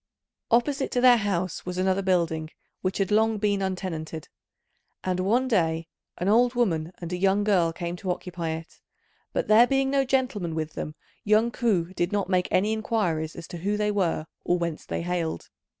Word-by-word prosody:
Opposite 270 Hz, +4 st, +2 dB
to 245 Hz, -, +2 dB
their 250 Hz, -1 st, +7 dB
house 190 Hz, -4 st, -2 dB
was 180 Hz, 0 st, -5 dB
another 190 Hz, +1 st, +1 dB
building, 170 Hz, -4 st, 0 dB, 0.3 s
which 185 Hz, 0 st, -1 dB
had 195 Hz, -1 st, 0 dB
long 220 Hz, +1 st, +3 dB
been 205 Hz, -1 st, +1 dB
untenanted; 170 Hz, -5 st, -4 dB, 0.7 s
and 185 Hz, -1 st, -1 dB
one 230 Hz, +8 st, +2 dB
day 165 Hz, -8 st, +1 dB, 0.3 s
an 180 Hz, -, -2 dB
old 240 Hz, +4 st, +4 dB
woman 170 Hz, -9 st, 0 dB
and 170 Hz, 0 st, -5 dB
a -, -, -1 dB
young 195 Hz, +2 st, +2 dB
girl 185 Hz, -5 st, +3 dB
came 170 Hz, +1 st, -4 dB
to 185 Hz, -, -5 dB
occupy 180 Hz, -2 st, -3 dB
it, 160 Hz, +1 st, -7 dB, 0.5 s
but -, -, -1 dB
there 225 Hz, +3 st, +7 dB
being 270 Hz, 0 st, +1 dB
no 275 Hz, -1 st, +3 dB
gentleman 250 Hz, -11 st, -1 dB
with 155 Hz, -1 st, -3 dB
them 150 Hz, -, -5 dB, 0.3 s
young 215 Hz, +3 st, +3 dB
Ku 190 Hz, -8 st, 0 dB
did 175 Hz, -1 st, -1 dB
not 200 Hz, -2 st, -1 dB
make 185 Hz, -1 st, +2 dB
any 210 Hz, +4 st, +2 dB
inquiries 180 Hz, -8 st, -1 dB
as 170 Hz, -, -8 dB
to 175 Hz, -, -6 dB
who 200 Hz, +5 st, -1 dB
they 210 Hz, 0 st, +1 dB
were 180 Hz, -6 st, 0 dB, 0.2 s
or 175 Hz, -, +2 dB
whence 170 Hz, -2 st, -4 dB
they -, -, -3 dB
hailed. 170 Hz, -, -3 dB
185 Hz, 185 wpm, -26 LUFS, 170-215 Hz, 0.7 s, their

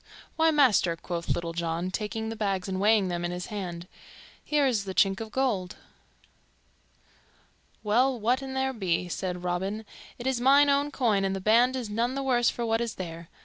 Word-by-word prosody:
"Why, 325 Hz, 0 st, +4 dB
master," 255 Hz, -, +3 dB
quoth 170 Hz, 0 st, -5 dB
Little 170 Hz, -1 st, -1 dB
John, 170 Hz, +2 st, -2 dB
taking 220 Hz, +2 st, -3 dB
the 225 Hz, -, -5 dB
bags 195 Hz, -4 st, -2 dB
and 190 Hz, -1 st, -3 dB
weighing 210 Hz, -1 st, +4 dB
them 175 Hz, -1 st, -3 dB
in 175 Hz, -, -1 dB
his 180 Hz, 0 st, -5 dB
hand, 175 Hz, -4 st, -5 dB, 0.6 s
"here 295 Hz, -2 st, +1 dB
is 225 Hz, -7 st, 0 dB
the 190 Hz, -1 st, -5 dB
chink 195 Hz, +1 st, +3 dB
of 220 Hz, -, -6 dB
gold." 215 Hz, -9 st, -1 dB, 2.1 s
"Well, 245 Hz, +4 st, +2 dB
what 245 Hz, +5 st, +1 dB
an 265 Hz, -1 st, -6 dB
there 265 Hz, 0 st, 0 dB
be," 180 Hz, -5 st, -1 dB
said 180 Hz, 0 st, -4 dB
Robin, 190 Hz, +5 st, -2 dB, 0.3 s
"it 240 Hz, -, -8 dB
is 260 Hz, -2 st, 0 dB
mine 280 Hz, +2 st, +6 dB
own 285 Hz, +1 st, +1 dB
coin 225 Hz, -8 st, +1 dB
and 195 Hz, 0 st, 0 dB
the -, -, -3 dB
band 235 Hz, +6 st, +4 dB
is 250 Hz, -3 st, -3 dB
none 230 Hz, +5 st, -1 dB
the 275 Hz, -, -2 dB
worse 245 Hz, -3 st, +3 dB
for 240 Hz, -, -3 dB
what 225 Hz, 0 st, +1 dB
is 235 Hz, -1 st, -3 dB
there. 170 Hz, -2 st, -7 dB
215 Hz, 190 wpm, -27 LUFS, 180-250 Hz, 2.1 s, mine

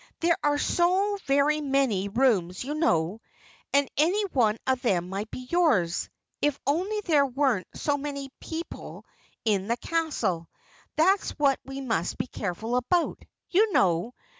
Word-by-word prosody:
There 335 Hz, 0 st, +3 dB
are 290 Hz, 0 st, +2 dB
so 375 Hz, +6 st, +1 dB
very 285 Hz, +2 st, +3 dB
many 265 Hz, -9 st, +1 dB
rooms 200 Hz, -6 st, +1 dB
you 280 Hz, +3 st, -3 dB
know 195 Hz, -, +1 dB, 0.5 s
and 280 Hz, 0 st, +3 dB
any 365 Hz, +8 st, +3 dB
one 225 Hz, -4 st, +3 dB
of 260 Hz, -1 st, +1 dB
them 180 Hz, -7 st, 0 dB
might 200 Hz, +3 st, -4 dB
be 255 Hz, 0 st, -8 dB
yours, 255 Hz, -, +2 dB, 0.3 s
if 295 Hz, -1 st, +1 dB
only 375 Hz, +9 st, 0 dB
there 300 Hz, -7 st, +3 dB
weren't 260 Hz, -6 st, 0 dB
so 290 Hz, -1 st, 0 dB
many 280 Hz, 0 st, -4 dB
other 270 Hz, -, -14 dB
people 330 Hz, +1 st, -7 dB, 0.4 s
in 200 Hz, -3 st, +1 dB
the 235 Hz, +1 st, 0 dB
castle. 235 Hz, -, -1 dB, 0.5 s
That's 375 Hz, +5 st, +2 dB
what 280 Hz, -2 st, +3 dB
we 270 Hz, 0 st, -6 dB
must 225 Hz, -10 st, -1 dB
be -, -, -1 dB
careful 220 Hz, +2 st, -3 dB
about, 330 Hz, +8 st, +1 dB, 0.3 s
you 420 Hz, +4 st, +4 dB
know. 185 Hz, +6 st, +2 dB
270 Hz, 150 wpm, -27 LUFS, 215-315 Hz, 0.5 s, you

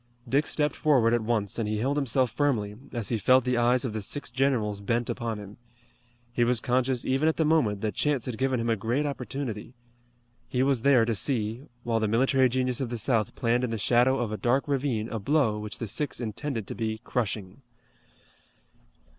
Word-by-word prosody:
Dick 140 Hz, +5 st, +2 dB
stepped 150 Hz, -1 st, 0 dB
forward 125 Hz, -7 st, +3 dB
at 120 Hz, -, +2 dB
once 110 Hz, -2 st, -1 dB
and 110 Hz, -2 st, -1 dB
he 105 Hz, -, -1 dB
held 135 Hz, +6 st, 0 dB
himself 130 Hz, -3 st, +1 dB
firmly, 120 Hz, -9 st, 0 dB, 0.2 s
as 115 Hz, -4 st, -3 dB
he 115 Hz, -, 0 dB
felt 130 Hz, +4 st, +5 dB
the 125 Hz, 0 st, 0 dB
eyes 120 Hz, +2 st, +2 dB
of 115 Hz, -, -3 dB
the 110 Hz, -, -3 dB
six 145 Hz, +6 st, -3 dB
generals 120 Hz, -6 st, 0 dB
bent 115 Hz, +4 st, -1 dB
upon 115 Hz, -2 st, -3 dB
him. 105 Hz, 0 st, -10 dB, 0.8 s
He 120 Hz, -, +2 dB
was 120 Hz, 0 st, +2 dB
conscious 125 Hz, 0 st, 0 dB
even 135 Hz, +4 st, +1 dB
at 160 Hz, -, -2 dB
the 160 Hz, -, +2 dB
moment 120 Hz, -11 st, +2 dB
that 110 Hz, -2 st, -1 dB
chance 145 Hz, +2 st, 0 dB
had 120 Hz, -4 st, -5 dB
given 130 Hz, -2 st, +1 dB
him 115 Hz, -, -2 dB
a 115 Hz, -, +2 dB
great 120 Hz, +8 st, -1 dB
opportunity. 125 Hz, -4 st, -5 dB, 0.7 s
He 125 Hz, 0 st, +1 dB
was 135 Hz, -3 st, +1 dB
there 130 Hz, -3 st, +5 dB
to 115 Hz, -, 0 dB
see, 115 Hz, +2 st, -1 dB, 0.2 s
while 115 Hz, -2 st, 0 dB
the 110 Hz, -, 0 dB
military 130 Hz, +4 st, +3 dB
genius 125 Hz, 0 st, 0 dB
of 130 Hz, -, -2 dB
the 120 Hz, -, -3 dB
South 110 Hz, -2 st, 0 dB
planned 120 Hz, 0 st, +1 dB
in 125 Hz, -, 0 dB
the 115 Hz, -, -2 dB
shadow 125 Hz, +5 st, +3 dB
of 120 Hz, -4 st, -2 dB
a 110 Hz, -, -3 dB
dark 130 Hz, +6 st, +1 dB
ravine 130 Hz, -6 st, -1 dB
a 115 Hz, -, -3 dB
blow 115 Hz, -2 st, +1 dB
which 105 Hz, 0 st, -5 dB
the 115 Hz, -, -4 dB
six 145 Hz, +8 st, -2 dB
intended 115 Hz, 0 st, -4 dB
to -, -, -6 dB
be 110 Hz, -1 st, -3 dB
crushing. 105 Hz, -2 st, -3 dB
120 Hz, 205 wpm, -27 LUFS, 110-135 Hz, 0.8 s, felt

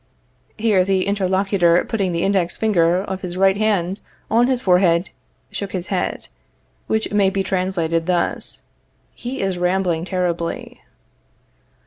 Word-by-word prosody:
(Here 210 Hz, -4 st, +3 dB
the 190 Hz, 0 st, +1 dB
interlocutor, 190 Hz, -3 st, +2 dB
putting 200 Hz, -5 st, -1 dB
the 170 Hz, 0 st, -1 dB
index 190 Hz, -3 st, +1 dB
finger 180 Hz, -4 st, +2 dB
of 190 Hz, -2 st, -5 dB
his 180 Hz, 0 st, -5 dB
right 195 Hz, 0 st, +4 dB
hand 200 Hz, -3 st, 0 dB, 0.3 s
on 235 Hz, +2 st, +4 dB
his 255 Hz, -2 st, +1 dB
forehead, 180 Hz, -2 st, +3 dB, 0.4 s
shook 200 Hz, -1 st, -5 dB
his 180 Hz, -1 st, -3 dB
head, 180 Hz, -, -2 dB, 0.6 s
which 220 Hz, -1 st, -1 dB
may 200 Hz, -2 st, +4 dB
be 195 Hz, 0 st, -1 dB
translated 180 Hz, -3 st, -1 dB
thus: 180 Hz, -1 st, -1 dB, 0.5 s
He 255 Hz, +3 st, -5 dB
is 190 Hz, -2 st, -1 dB
rambling 180 Hz, -2 st, +1 dB
terribly.) 175 Hz, -3 st, -3 dB
190 Hz, 130 wpm, -20 LUFS, 175-200 Hz, 0.6 s, right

